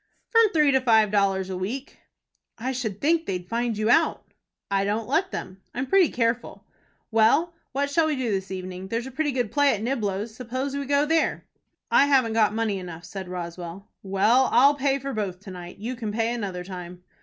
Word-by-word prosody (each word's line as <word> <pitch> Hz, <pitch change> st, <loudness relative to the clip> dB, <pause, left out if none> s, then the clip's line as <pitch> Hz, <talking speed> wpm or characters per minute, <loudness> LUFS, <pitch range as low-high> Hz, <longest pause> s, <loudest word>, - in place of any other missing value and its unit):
"From 455 Hz, -3 st, +5 dB
three 300 Hz, -6 st, +4 dB
to 265 Hz, -1 st, +3 dB
five 220 Hz, -4 st, +4 dB
dollars 195 Hz, -2 st, +1 dB
a -, -, -3 dB
week." 220 Hz, +10 st, -5 dB, 0.6 s
"I 250 Hz, +3 st, -2 dB
should 225 Hz, -6 st, -3 dB
think 325 Hz, +2 st, +1 dB
they'd 180 Hz, -1 st, -3 dB
find 230 Hz, 0 st, -1 dB
you 215 Hz, +2 st, +2 dB
out." 325 Hz, +4 st, +2 dB, 0.4 s
"I 195 Hz, 0 st, +2 dB
don't 210 Hz, +2 st, -1 dB
let 335 Hz, +9 st, +1 dB
them. 190 Hz, -, -7 dB
I'm 255 Hz, +2 st, -1 dB
pretty 375 Hz, +2 st, +4 dB
careful. 230 Hz, -1 st, -2 dB, 0.5 s
Well, 225 Hz, +10 st, +3 dB, 0.2 s
what 280 Hz, +1 st, -1 dB
shall 320 Hz, +1 st, +3 dB
we 305 Hz, -, 0 dB
do 255 Hz, -4 st, -1 dB
this 190 Hz, -1 st, -2 dB
evening? 185 Hz, 0 st, -6 dB
There's 230 Hz, +4 st, -2 dB
a 265 Hz, -, -7 dB
pretty 295 Hz, +3 st, 0 dB
good 245 Hz, -5 st, -1 dB
play 285 Hz, -3 st, +3 dB
at 210 Hz, -, -6 dB
Niblo's. 215 Hz, -3 st, -2 dB
Suppose 255 Hz, +3 st, -4 dB
we 280 Hz, -1 st, -3 dB
go 285 Hz, +1 st, +3 dB
there." 325 Hz, +1 st, +1 dB, 0.5 s
"I 280 Hz, -, +5 dB
haven't 260 Hz, -5 st, +3 dB
got 220 Hz, -2 st, +3 dB
money 220 Hz, -3 st, 0 dB
enough," 175 Hz, -2 st, -8 dB
said 190 Hz, 0 st, -7 dB
Roswell. 175 Hz, +1 st, -7 dB
"Well, 210 Hz, +7 st, +3 dB
I'll 280 Hz, +3 st, +6 dB
pay 275 Hz, -1 st, +1 dB
for 275 Hz, 0 st, -5 dB
both 195 Hz, -4 st, -3 dB
to 200 Hz, -, -10 dB
night. 180 Hz, -1 st, -9 dB
You 235 Hz, +5 st, -4 dB
can 225 Hz, -3 st, -4 dB
pay 225 Hz, +2 st, 0 dB
another 195 Hz, -6 st, -4 dB
time." 180 Hz, -1 st, -9 dB
225 Hz, 200 wpm, -25 LUFS, 195-275 Hz, 0.6 s, I'll